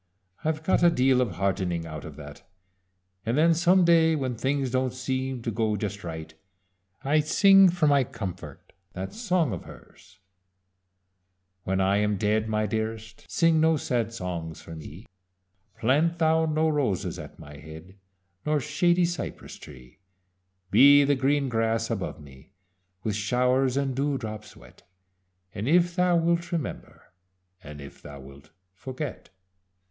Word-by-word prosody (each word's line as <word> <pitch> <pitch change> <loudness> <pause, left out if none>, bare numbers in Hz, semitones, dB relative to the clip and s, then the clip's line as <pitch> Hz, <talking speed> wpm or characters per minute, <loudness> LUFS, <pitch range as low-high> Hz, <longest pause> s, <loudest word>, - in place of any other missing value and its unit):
"I've 155 0 -2
got 190 - +2
a 175 - +6
deal 130 -4 +3
of 115 -7 -1
heartening 90 -2 -1
out 75 -2 -8
of 75 - -9
that, 75 -1 -11 0.8
and 115 +4 -1
then 165 +2 +5
some 175 +2 +4
day 165 -1 +4
when 130 -4 -2
things 135 +1 -1
don't 130 -1 0
seem 130 -1 -3
to 115 - -2
go 110 0 0
just 105 0 -5
right, 80 -2 -7 0.7
I 145 +3 +2
sing 195 +5 +6
for 175 -2 0
my 140 -2 +4
comfort 90 - -8 0.2
that 95 +1 -6
song 180 - 0
of 90 - -7
hers: 100 0 -16 1.5
"When 95 +1 0
I 95 +1 +2
am 105 0 0
dead, 110 +2 0
my 110 0 0
dearest, 110 +1 -5
Sing 165 -2 +3
no 160 0 +3
sad 120 -5 -1
songs 85 -6 -5
for 80 - -11
me; 80 +6 -11 0.7
Plant 150 +8 +1
thou 160 0 +2
no 155 +1 +1
roses 140 - -1
at - - -10
my 75 0 -12
head, 80 +5 -12 0.5
Nor 150 0 +1
shady 175 +5 +2
cypress 175 0 -6
tree: 60 -1 -14 0.7
Be 145 +1 +7
the 140 +1 +2
green 140 +1 +1
grass 115 -1 -1
above 95 -5 -4
me, 70 +4 -16 0.5
With 105 -2 -2
showers 125 +5 +1
and 135 -2 -1
dew 140 +1 0
drops 110 -3 -8
wet, - - -17 0.7
And 105 +2 -4
if 175 +2 +3
thou 180 -1 +2
wilt, 170 +1 0
remember, 155 - -6 0.5
And 75 0 -10
if 70 -1 -12
thou 70 -1 -10
wilt, 70 +1 -14 0.2
forget. 130 +7 -7
125 Hz, 150 wpm, -26 LUFS, 95-155 Hz, 1.5 s, Be